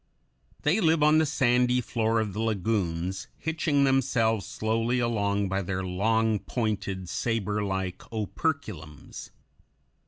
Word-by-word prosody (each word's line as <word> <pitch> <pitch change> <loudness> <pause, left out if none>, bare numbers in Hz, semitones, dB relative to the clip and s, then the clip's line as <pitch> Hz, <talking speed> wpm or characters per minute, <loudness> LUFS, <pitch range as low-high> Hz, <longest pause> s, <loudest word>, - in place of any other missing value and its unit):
They 165 +8 +3
live 160 -3 +3
on 155 +1 +5
the 160 - +2
sandy 125 -3 +2
floor 115 -1 0
of 105 -3 -2
the 105 - -4
lagoons, 95 -4 -1
hitching 160 -3 0
themselves 125 -5 +2
slowly 115 +3 0
along 100 -4 0
by 95 +1 -1
their 95 0 -3
long 110 +4 +1
pointed, 100 -6 -3
saberlike 100 -3 -2
operculums. 105 - -4
110 Hz, 115 wpm, -27 LUFS, 95-125 Hz, -, on